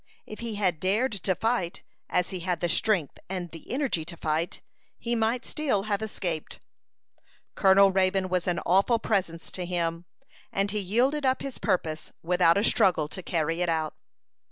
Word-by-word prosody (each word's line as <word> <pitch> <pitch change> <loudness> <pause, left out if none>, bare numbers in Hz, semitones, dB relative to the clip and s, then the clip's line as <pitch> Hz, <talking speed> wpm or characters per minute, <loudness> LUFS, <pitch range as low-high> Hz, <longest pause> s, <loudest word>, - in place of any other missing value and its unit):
If 215 - -9
he 230 -2 -4
had 185 -6 +1
dared 210 +9 +1
to 190 -2 -1
fight, 220 -6 -1 0.3
as 180 -1 +1
he 185 - -4
had 175 -1 -1
the 175 - 0
strength 180 -4 +1
and 180 -3 -4
the 165 - -12
energy 255 - 0
to 170 0 -9
fight, 160 +2 -2 0.3
he 235 - -2
might 230 +2 0
still 270 -10 0
have 205 0 -1
escaped. 180 -7 -4 0.9
Colonel 195 0 +6
Raybone 190 0 +2
was 180 -1 -1
an 175 -1 +1
awful 195 +6 +4
presence 185 -7 -1
to 185 - -3
him, 170 -1 -2 0.5
and 195 +1 0
he 210 - -1
yielded 245 +10 +1
up 260 -1 +1
his 275 -2 -5
purpose 160 -3 -1
without 175 0 +4
a 200 - +2
struggle 185 -9 +4
to 185 - -7
carry 165 0 -1
it 175 - +1
out. 160 -1 0
185 Hz, 175 wpm, -27 LUFS, 170-215 Hz, 0.9 s, Colonel